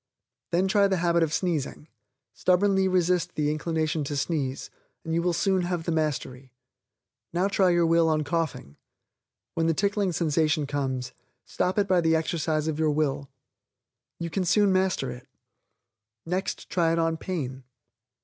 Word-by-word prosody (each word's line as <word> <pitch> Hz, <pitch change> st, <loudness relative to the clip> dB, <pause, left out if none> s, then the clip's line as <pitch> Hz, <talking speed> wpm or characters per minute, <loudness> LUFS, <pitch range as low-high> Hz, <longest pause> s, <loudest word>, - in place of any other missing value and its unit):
Then 180 Hz, +3 st, +1 dB
try 200 Hz, +1 st, +4 dB
the 190 Hz, -1 st, 0 dB
habit 170 Hz, 0 st, +2 dB
of 160 Hz, -2 st, +1 dB
sneezing; 155 Hz, -3 st, -2 dB, 0.5 s
stubbornly 190 Hz, +1 st, +2 dB
resist 180 Hz, -2 st, +1 dB
the 150 Hz, -1 st, +1 dB
inclination 155 Hz, 0 st, -1 dB
to 145 Hz, +1 st, -3 dB
sneeze, 140 Hz, -3 st, -2 dB, 0.3 s
and 160 Hz, -, -3 dB
you 170 Hz, -, +2 dB
will 175 Hz, +1 st, +1 dB
soon 190 Hz, +2 st, +1 dB
have 175 Hz, -1 st, -2 dB
the 170 Hz, -, -2 dB
mastery. 135 Hz, -5 st, -2 dB, 0.8 s
Now 180 Hz, +3 st, +2 dB
try 195 Hz, -2 st, +3 dB
your 175 Hz, -1 st, +3 dB
will 165 Hz, 0 st, +3 dB
on 155 Hz, -1 st, +1 dB
coughing. 155 Hz, -, -3 dB, 0.8 s
When 165 Hz, -1 st, 0 dB
the 165 Hz, -, +2 dB
tickling 200 Hz, 0 st, +1 dB
sensation 155 Hz, -2 st, +1 dB
comes, 130 Hz, -3 st, -3 dB, 0.3 s
stop 185 Hz, +3 st, -1 dB
it 200 Hz, -1 st, +2 dB
by 185 Hz, -2 st, +3 dB
the 165 Hz, -1 st, +3 dB
exercise 160 Hz, -1 st, -1 dB
of 155 Hz, -1 st, -2 dB
your 160 Hz, -1 st, +2 dB
will. 145 Hz, -2 st, -1 dB, 0.9 s
You 170 Hz, -1 st, -5 dB
can 190 Hz, -, 0 dB
soon 200 Hz, +2 st, +3 dB
master 185 Hz, -9 st, +1 dB
it. 125 Hz, 0 st, -11 dB, 1.0 s
Next 185 Hz, +3 st, -3 dB
try 165 Hz, -2 st, +1 dB
it -, -, 0 dB
on 165 Hz, 0 st, +1 dB
pain. 140 Hz, -8 st, -4 dB
165 Hz, 160 wpm, -26 LUFS, 150-180 Hz, 1.0 s, try